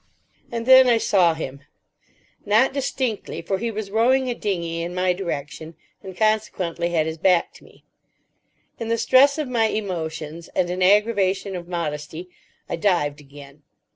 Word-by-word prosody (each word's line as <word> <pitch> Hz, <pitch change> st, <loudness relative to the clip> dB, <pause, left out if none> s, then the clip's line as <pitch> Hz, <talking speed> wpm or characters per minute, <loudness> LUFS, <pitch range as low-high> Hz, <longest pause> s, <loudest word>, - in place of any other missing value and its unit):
And 230 Hz, -1 st, -4 dB
then 260 Hz, 0 st, +8 dB
I 235 Hz, -2 st, +4 dB
saw 180 Hz, -7 st, +3 dB
Him. 140 Hz, -3 st, -7 dB, 0.8 s
Not 215 Hz, +6 st, +3 dB
distinctly, 260 Hz, -9 st, -3 dB
for 190 Hz, +3 st, -2 dB
he 235 Hz, -, -2 dB
was 215 Hz, -2 st, -5 dB
rowing 250 Hz, +4 st, +2 dB
a -, -, -1 dB
dinghy 170 Hz, -7 st, -3 dB
in 175 Hz, +1 st, -5 dB
my 180 Hz, 0 st, +1 dB
direction, 160 Hz, -3 st, -6 dB, 0.3 s
and 190 Hz, -2 st, -10 dB
consequently 200 Hz, -6 st, 0 dB
had 165 Hz, -3 st, +1 dB
his 160 Hz, 0 st, -5 dB
back 180 Hz, -1 st, +2 dB
to -, -, -17 dB
me. -, -, -20 dB, 1.0 s
In 230 Hz, -, -4 dB
the 230 Hz, 0 st, 0 dB
stress 275 Hz, +5 st, +4 dB
of 305 Hz, -3 st, -2 dB
my 235 Hz, -3 st, +1 dB
emotions 165 Hz, -6 st, -4 dB
and 175 Hz, -1 st, +1 dB
an 180 Hz, +1 st, -4 dB
aggravation 200 Hz, -1 st, +2 dB
of 175 Hz, -1 st, -7 dB
modesty, 160 Hz, 0 st, -5 dB, 0.4 s
I -, -, -3 dB
dived 155 Hz, -6 st, 0 dB
again. 140 Hz, 0 st, -14 dB
185 Hz, 160 wpm, -22 LUFS, 165-220 Hz, 1.0 s, then